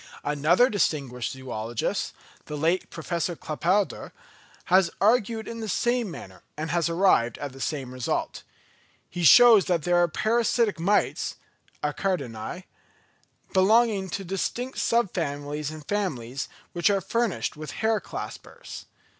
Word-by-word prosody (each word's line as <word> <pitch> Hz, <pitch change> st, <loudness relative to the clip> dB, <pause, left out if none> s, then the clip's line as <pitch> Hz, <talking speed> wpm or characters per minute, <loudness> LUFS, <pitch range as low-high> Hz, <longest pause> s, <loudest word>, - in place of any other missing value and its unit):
Another 150 Hz, -, +3 dB
distinguished 140 Hz, -, -1 dB
zoologist, 120 Hz, -3 st, -3 dB, 0.3 s
the 150 Hz, -, -5 dB
late 165 Hz, +5 st, 0 dB
Professor 170 Hz, +1 st, -3 dB
Claparède, 180 Hz, +7 st, -1 dB, 0.5 s
has 185 Hz, -1 st, +4 dB
argued 220 Hz, +1 st, +2 dB
in 230 Hz, 0 st, -6 dB
the 220 Hz, -1 st, -4 dB
same 240 Hz, +2 st, 0 dB
manner, 95 Hz, -, -10 dB, 0.2 s
and 155 Hz, 0 st, -3 dB
has 170 Hz, -1 st, +1 dB
arrived 165 Hz, -9 st, +3 dB
at 145 Hz, -2 st, -5 dB
the 135 Hz, -, -11 dB
same 135 Hz, -5 st, -3 dB
result. 130 Hz, -2 st, -2 dB, 0.7 s
He 175 Hz, -, -4 dB
shows 230 Hz, -, +8 dB
that 170 Hz, -4 st, 0 dB
there 175 Hz, 0 st, +2 dB
are 175 Hz, 0 st, +4 dB
parasitic 225 Hz, +1 st, +1 dB
mites 200 Hz, +5 st, +1 dB, 0.5 s
(Acaridæ), 150 Hz, -, -3 dB, 0.9 s
belonging 200 Hz, 0 st, +3 dB
to 195 Hz, -, -4 dB
distinct 215 Hz, +8 st, -3 dB
sub 235 Hz, -5 st, +1 dB
families 145 Hz, -2 st, -3 dB
and 155 Hz, -1 st, -10 dB
families, 140 Hz, -, -3 dB, 0.2 s
which 175 Hz, +3 st, +2 dB
are 200 Hz, -1 st, +2 dB
furnished 230 Hz, +2 st, -1 dB
with 155 Hz, -1 st, -7 dB
hair 220 Hz, +4 st, 0 dB
claspers. -, -, -8 dB
175 Hz, 130 wpm, -26 LUFS, 145-210 Hz, 0.9 s, shows